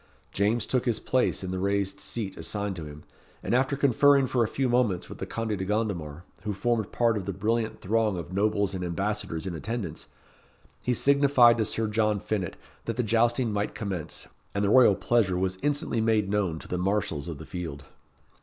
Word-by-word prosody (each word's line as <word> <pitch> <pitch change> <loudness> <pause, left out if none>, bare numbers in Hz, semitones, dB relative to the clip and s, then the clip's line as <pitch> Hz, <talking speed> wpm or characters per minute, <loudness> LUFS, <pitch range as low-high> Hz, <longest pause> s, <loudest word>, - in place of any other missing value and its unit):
James 105 +3 +1
took 125 -1 0
his 120 -3 +1
place 130 -5 0
in 95 - -4
the 95 - -2
raised 100 0 0
seat 100 -5 -3
assigned 100 -2 -3
to 85 -3 -6
him, 75 0 -10 0.4
and - - -1
after 135 +3 +2
conferring 140 +1 +5
for 125 -1 +1
a - - 0
few 135 +4 -1
moments 120 -7 +1
with - - -10
the - - -4
Conde 115 -2 -2
de 95 - -3
Gondomar, 95 -7 -2 0.2
who 105 -1 -3
formed 110 +1 -1
part 115 -2 +2
of 100 - -5
the - - 0
brilliant 110 +4 -1
throng 110 -1 +1
of 85 +1 -6
nobles 100 0 +1
and 90 -1 -3
ambassadors 95 -2 -2
in 95 - -3
attendance, 100 0 -5 0.7
he 125 - 0
signified 135 -4 +5
to 110 - +2
Sir 110 +2 -1
John 105 -1 +1
Finett 95 -3 -3 0.3
that - - -2
the 125 - +1
jousting 115 +1 +2
might 105 0 -2
commence, 95 -7 -4 0.3
and 100 +1 +1
the 100 - +2
royal 130 0 +7
pleasure 105 -7 +1
was 95 0 -1
instantly 145 -5 0
made 110 -3 +2
known 100 -6 0
to - - -10
the 90 - -2
marshals 90 -6 -1
of 80 -4 -5
the - - -9
field. 80 -6 -6
105 Hz, 200 wpm, -27 LUFS, 95-120 Hz, 0.7 s, royal